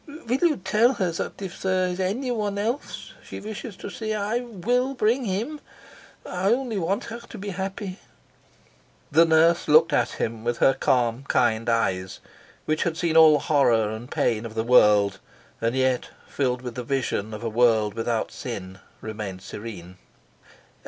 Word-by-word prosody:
"Will 245 +3 0
you 340 -4 +3
tell 210 +7 +3
her 185 -7 -1
that 170 +4 -5
if 185 -2 -7
there 185 -1 +1
is 180 +1 -4
anyone 210 +1 -1
else 230 +7 -4
she - - -8
wishes 215 0 -7
to 200 - -8
see 215 +4 -3
I 210 +3 -1
will 245 +3 -1
bring 240 +3 +1
him? 225 +10 -3 0.7
I 185 +3 0
only 240 -4 0
want 185 +3 -1
her 230 +1 -7
to 235 -1 -11
be 200 +1 -6
happy." 190 0 -5 1.1
The 165 +3 +6
nurse 165 +1 +3
looked 155 +2 +5
at - - +1
him 110 -1 -3
with 120 0 -1
her 135 - +4
calm, 125 -1 +1
kind 115 -1 +1
eyes, 95 -6 0 0.5
which 155 0 0
had 165 -2 -1
seen 165 -2 0
all 160 -1 +8
the 145 - +1
horror 120 -8 +3
and 110 +3 -7
pain 110 -2 0
of 115 -1 -8
the 110 - 0
world, 105 -5 +4 0.4
and 115 +2 0
yet, 130 -1 +1 0.2
filled 125 -2 -1
with 125 -2 -5
the 125 +1 -5
vision 120 -5 -2
of 110 +1 -7
a - - -1
world 110 -2 +3
without 115 -1 -2
sin, 95 -6 -7 0.2
remained 105 -4 -6
serene. 95 -5 -8
160 Hz, 170 wpm, -25 LUFS, -, 1.1 s, all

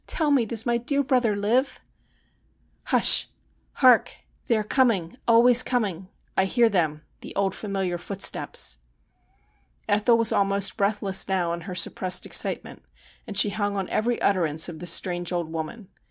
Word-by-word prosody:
tell 310 -3 0
me, 255 -5 +2
does 225 0 -4
my 240 -1 0
dear 280 +4 -1
brother 245 -5 0
live? 230 +7 -1 0.4
' - - -43
' - - -42
Hush! - - +5 0.5
Hark! 255 -3 +3 0.3
They 235 -4 +1
are 215 - -2
coming 210 -7 0
— - - -40
always 240 +1 +6
coming. 200 -9 -3 0.3
I 190 - +2
hear 235 +4 +2
them; 155 -6 -1 0.2
the - - -11
old 195 -1 -1
familiar 195 -4 -4
footsteps.' 180 - -1 1.1
Ethel 210 +3 +2
was 230 -1 +1
almost 200 0 0
breathless 200 -2 0
now 180 -3 -1
in 170 - -6
her 180 +2 -8
suppressed 180 +1 +1
ex - - +1
citement, - - -3 0.5
and 205 - -5
she 205 - +6
hung 205 -1 -3
on 190 -2 -3
every 235 +2 -1
utterance 160 -5 +1
of 165 -3 -9
the 175 - -8
strange 175 0 0
old 170 -2 -4
woman. 165 +6 -7
200 Hz, 170 wpm, -24 LUFS, 180-230 Hz, 1.1 s, always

